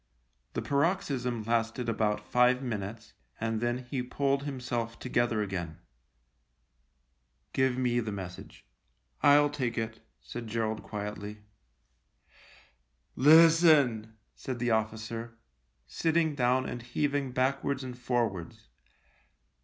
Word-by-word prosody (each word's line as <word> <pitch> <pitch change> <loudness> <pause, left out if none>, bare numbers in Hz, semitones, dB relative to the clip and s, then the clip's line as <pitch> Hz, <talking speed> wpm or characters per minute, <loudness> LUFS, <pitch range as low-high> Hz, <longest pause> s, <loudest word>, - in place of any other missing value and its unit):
The - - -3
paroxysm 140 - 0
lasted 115 +2 -1
about 105 -2 0
five 125 +1 +3
minutes, 110 -1 -5 0.3
and 115 0 -1
then 120 +1 -1
he 130 - -1
pulled 135 +2 0
himself 120 -4 -3
together 120 -3 0
again. 90 -5 -4 0.9
" 60 +2 -45
Give 130 -1 +2
me 125 -1 +1
the 110 -2 -3
message. 95 -3 -8 0.6
I'll 145 0 +6
take 125 -5 -2
it," 110 0 -3 0.2
said 120 -1 -7
Gerald 110 -1 -2
quietly. 105 0 -6 0.9
" 65 +4 -28
Listen," 150 -7 +5 0.2
said 130 -2 -5
the 120 0 0
officer, 110 +1 -2 0.5
sitting 160 - +1
down 130 -1 +1
and 120 - -5
heaving 140 +2 -1
backwards 135 +1 0
and 125 -1 -6
forwards. 115 - -2
120 Hz, 110 wpm, -30 LUFS, 110-130 Hz, 0.9 s, I'll